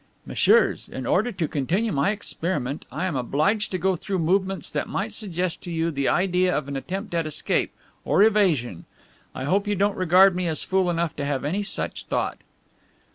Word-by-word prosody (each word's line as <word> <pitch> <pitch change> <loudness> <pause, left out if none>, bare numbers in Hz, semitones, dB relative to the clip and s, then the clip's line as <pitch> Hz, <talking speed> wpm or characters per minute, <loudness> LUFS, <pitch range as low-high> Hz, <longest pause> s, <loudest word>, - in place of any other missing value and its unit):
"Messieurs, - - +3
in 130 - -5
order 215 - +2
to 175 -6 -2
continue 180 - 0
my 140 +3 +1
experiment 165 -9 -3
I 185 - -2
am 180 -6 -2
obliged 155 - 0
to 185 - -2
go 190 +1 +1
through 190 +3 -3
movements 190 +3 0
that - - -2
might 210 +3 -3
suggest 185 -4 -3
to 175 - -7
you 165 0 0
the 140 -2 -1
idea 180 0 +2
of 150 -2 -3
an 140 - -5
attempt 190 +8 -5
at 165 -2 0
escape, 155 - -1 0.3
or 200 - +4
evasion. 170 - +2 0.5
I 130 - -4
hope 195 +9 +1
you 205 - +1
don't 200 +2 +2
regard 185 +1 +5
me 180 -1 -1
as 160 -2 -1
fool 190 -1 +1
enough 170 -2 -1
to 140 - -2
have 140 -2 -2
any 185 +8 0
such 205 - -4
thought." - - -2
180 Hz, 190 wpm, -24 LUFS, 150-195 Hz, 0.5 s, regard